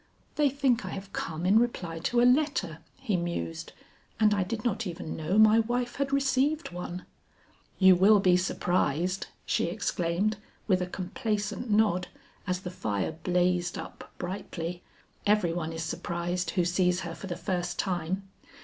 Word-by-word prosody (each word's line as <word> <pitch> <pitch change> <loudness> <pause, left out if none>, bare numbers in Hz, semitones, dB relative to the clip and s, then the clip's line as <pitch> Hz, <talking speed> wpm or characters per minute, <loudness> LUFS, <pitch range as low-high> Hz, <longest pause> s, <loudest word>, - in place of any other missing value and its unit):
"They 295 -2 +3
think 265 -4 +1
I 185 - -5
have 195 +1 -7
come 165 +1 -3
in 200 +4 +6
reply 175 -9 -2
to 240 +8 +1
a - - +5
letter," 250 - +2 0.2
he 245 -7 -1
mused, 170 - -3 0.5
"and 215 -1 +5
I 200 - +1
did 215 +4 -3
not 220 -2 0
even 170 -2 -5
know 160 +6 -1
my 215 +1 +7
wife 245 +2 -1
had 280 0 -1
received 275 - +1
one." 180 0 -6 0.7
"You 190 -1 +7
will 200 +4 +6
be 185 -2 +4
surprised," 180 -1 0 0.2
she - - +1
exclaimed 180 +5 -1 0.3
with 185 -3 +2
a 180 - -1
complacent 210 +4 -3
nod 205 -4 +3 0.4
as 180 0 -1
the 180 - -6
fire 105 - -2
blazed 175 +1 0
up - - -9
brightly; 175 -2 -5 0.5
"every 205 -5 +3
one 165 -2 -3
is 165 0 -4
surprised 175 +2 -2
who 175 - +3
sees 180 +1 +2
her 170 -2 -5
for 195 - -8
the 175 - -3
first 175 -3 -2
time. 185 +1 -2
185 Hz, 160 wpm, -28 LUFS, 175-215 Hz, 0.7 s, my